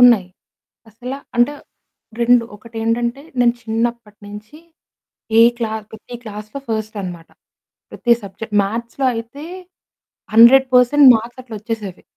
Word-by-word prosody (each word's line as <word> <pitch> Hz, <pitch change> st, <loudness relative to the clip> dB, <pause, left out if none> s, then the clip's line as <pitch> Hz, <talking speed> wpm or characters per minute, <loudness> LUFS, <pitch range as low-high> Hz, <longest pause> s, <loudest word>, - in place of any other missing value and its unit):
ఉన్నాయి. 235 Hz, -7 st, +6 dB, 0.6 s
అసలా 250 Hz, +5 st, -7 dB, 0.2 s
అంటే 240 Hz, +4 st, +3 dB, 0.7 s
2 240 Hz, 0 st, +4 dB
ఒకటేంటంటే 230 Hz, +3 st, -3 dB, 0.2 s
నేను 240 Hz, -1 st, +4 dB
చిన్నప్పటి 225 Hz, -1 st, -3 dB
నించి 210 Hz, +7 st, -11 dB, 0.8 s
ఏ -, -, +8 dB, 0.2 s
క్లాస్ 220 Hz, -2 st, -3 dB
ప్రతి 220 Hz, +3 st, -11 dB
క్లాస్‌లో 215 Hz, +2 st, -8 dB
ఫస్ట్ 220 Hz, -1 st, -3 dB
అన్నమాట. 175 Hz, -3 st, -8 dB, 0.6 s
ప్రతి 240 Hz, -2 st, +1 dB
సబ్జెక్ట్ 205 Hz, +2 st, -6 dB
మ్యాథ్స్‌లో 235 Hz, +6 st, -3 dB
అయితే 230 Hz, +6 st, -7 dB, 0.9 s
100 255 Hz, +4 st, +8 dB
పర్సెంట్ 265 Hz, +3 st, +5 dB
మార్క్స్ 235 Hz, +3 st, -8 dB
అట్లా 240 Hz, -3 st, -10 dB
ఒచ్చేసేవి. 215 Hz, -4 st, -6 dB
230 Hz, 115 wpm, -18 LUFS, 215-240 Hz, 0.9 s, ఏ